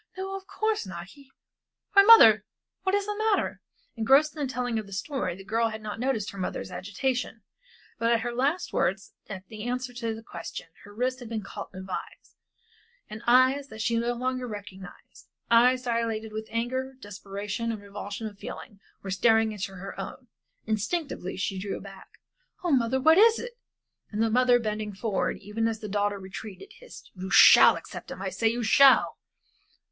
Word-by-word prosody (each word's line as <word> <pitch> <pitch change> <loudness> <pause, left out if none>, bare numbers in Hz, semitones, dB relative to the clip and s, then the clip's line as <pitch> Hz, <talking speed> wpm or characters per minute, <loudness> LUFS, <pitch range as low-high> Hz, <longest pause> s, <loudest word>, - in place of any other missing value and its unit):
No, 385 +1 -4
of 385 0 -9
course 435 - -1
not 175 0 -8
he 280 +2 -17 0.6
why, 400 - +9
mother, 310 - +8 0.4
what 385 +1 +1
is 405 -1 0
the 415 0 -3
matter?" 435 -1 0 0.3
Engrossed 270 +7 +4
in 305 - -5
the - - -6
telling 245 -3 -2
of 215 - -7
her - - -14
story, 195 - -3
the 195 - -11
girl 225 +3 0
had 220 0 -6
not 210 +1 -6
noticed 240 -5 -1
her 200 - -10
mother's 185 0 -4
agitation, 220 +5 -3 0.6
but 230 +1 +2
at 230 -1 +2
her 240 +1 -3
last 285 +8 -1
words, 195 +2 -1 0.2
at 190 -2 -7
the 215 0 -9
answer 250 +2 -3
to 230 -2 -3
the 225 - -11
question, 170 - -8 0.2
her 205 - -13
wrist 255 +4 -2
had 240 -3 -9
been 220 -2 -4
caught - - -8
as - - -8
in 190 - -7
a - - -10
vise, 190 - -8 0.8
and 215 0 -7
eyes 260 +3 +4
that 220 -4 -11
she 230 +1 0
no 235 +1 0
longer 255 +1 -3
recognized 195 -4 -11 0.2
eyes 250 +2 +5
dilated 230 -2 -2
with 220 0 -5
anger, 260 +3 -3
desperation 205 +2 -5
and 220 - -5
revulsion 205 +1 -7
of 205 -2 -8
feeling 205 0 -9 0.2
were 195 - -5
staring 225 +3 +3
into 200 -2 -5
her 195 +2 -7
own. 250 +6 -7 0.4
Instinctively 220 - -3
she 190 0 -2
drew 195 +1 -4
back 195 -1 -13 0.5
"Oh, 350 - 0
mother, 260 -1 +2
what 320 +6 +5
is 455 +1 +6
it?" 480 0 -8 0.5
And 215 +1 -1
the 225 - +1
mother 250 +1 +4
bending 215 -2 -3
forward, 205 0 -1
even 210 +3 -2
as 225 -1 -3
the 215 - -6
daughter 205 0 0
retreated, 195 - -9
hissed, - - -14
"You 185 0 -7
shall - - +8
accept - - -9
him - - -7
I - - -2
say 225 - 0
you 235 +2 0
shall!" 270 +5 +5
225 Hz, 190 wpm, -27 LUFS, 205-255 Hz, 0.8 s, why